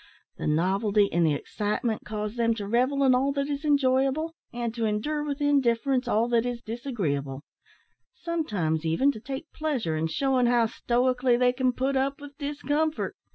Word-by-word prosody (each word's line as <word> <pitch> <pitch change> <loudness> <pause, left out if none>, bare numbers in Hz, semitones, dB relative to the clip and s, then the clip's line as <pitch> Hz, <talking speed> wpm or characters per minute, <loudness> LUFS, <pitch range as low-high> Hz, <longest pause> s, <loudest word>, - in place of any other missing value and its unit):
The - - -3
novelty 200 +6 +2
and 170 +1 +3
the 150 - +2
excitement 210 - -2
cause 210 0 -4
them 230 -1 +1
to 205 -2 -5
revel 255 +5 +2
in 260 -1 +5
all 265 +2 +2
that 280 0 -1
is 285 0 -3
enjoyable, 280 +2 +2 0.2
and 235 -1 -3
to 230 -1 -2
endure 295 +9 -1
with 290 0 -4
indifference 265 -2 +2
all 230 0 +2
that 235 -1 +3
is 245 -1 -4
disagreeable; 165 - -3 0.7
sometimes, 205 - -2
even, 165 - +2
to 220 - -9
take 275 +7 -7
pleasure 260 - -1
in 155 +1 0
shewing 260 +6 +1
how 240 -1 +4
stoically 250 +2 +1
they 250 0 +3
can 255 0 +1
put 265 +2 -1
up 275 +2 0
with 285 -1 -11
discomfort. 295 +2 -1
245 Hz, 170 wpm, -27 LUFS, 215-280 Hz, 0.7 s, in